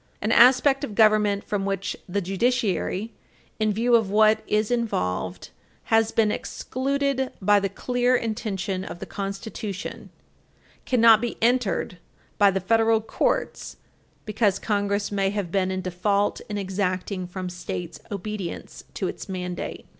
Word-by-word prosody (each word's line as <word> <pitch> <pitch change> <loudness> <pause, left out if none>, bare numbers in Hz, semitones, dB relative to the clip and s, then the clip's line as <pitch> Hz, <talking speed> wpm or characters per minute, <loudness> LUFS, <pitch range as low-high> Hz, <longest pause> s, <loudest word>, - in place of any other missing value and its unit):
An 215 - -1
aspect 260 +4 +5
of 220 -8 -4
government 210 -2 +4
from 205 -2 -2
which 195 -1 -2
the 200 +3 -1
judiciary, 205 +1 -1 0.5
in 215 -1 +2
view 235 +4 +1
of 225 -4 +2
what 215 +1 +4
is 215 +2 +1
involved, 90 - -2 0.4
has 225 0 +4
been 220 -2 +2
excluded 270 +2 -2
by 205 +1 +4
the 195 0 -1
clear 245 +3 +1
intention 210 -5 -2
of 185 - -7
the - - -7
Constitution 200 +1 -6 0.8
cannot 230 -3 +6
be 240 -1 -3
entered 230 -6 +1 0.4
by 205 -1 +7
the 195 0 0
federal 225 +3 +3
courts 220 - -2 0.5
because 210 -2 +1
Congress 205 -1 -1
may 195 -1 +1
have 200 -4 -3
been 190 -1 +1
in 185 0 -2
default 200 +3 0
in 205 - -3
exacting 185 -1 -2
from 185 +1 -5
States 175 -1 -6
obedience 200 -3 -6
to - - -1
its - - -7
mandate. 180 -1 -5
205 Hz, 140 wpm, -24 LUFS, 190-225 Hz, 0.8 s, by